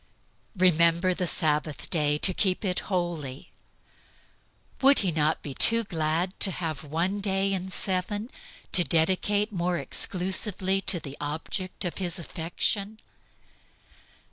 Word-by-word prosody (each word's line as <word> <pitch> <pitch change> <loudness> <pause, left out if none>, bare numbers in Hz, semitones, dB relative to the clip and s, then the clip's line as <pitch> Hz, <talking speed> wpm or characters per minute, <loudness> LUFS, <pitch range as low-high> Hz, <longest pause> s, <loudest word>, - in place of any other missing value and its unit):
"Remember 170 0 +3
the 180 0 -2
Sabbath 150 -2 -1
day 150 -3 +1
to 185 +5 +4
keep 190 +2 0
it 180 -2 -1
holy." 170 -8 -4 1.3
Would 275 +1 +6
he 180 - +1
not 155 0 0
be 140 - -6
too 230 +10 +4
glad 165 0 -2
to - - +8
have 165 -5 -4
one 170 +7 -2
day 195 0 0
in 190 0 -4
seven 195 +5 -2 0.4
to 175 - +6
dedicate 190 +6 +1
more 180 -2 -1
exclusively 190 +2 -1
to 185 -2 +3
the 140 -2 -10
object 160 +6 -4
of 175 - -4
his 180 -2 0
affection? 195 +5 -2
180 Hz, 125 wpm, -26 LUFS, 160-195 Hz, 1.3 s, to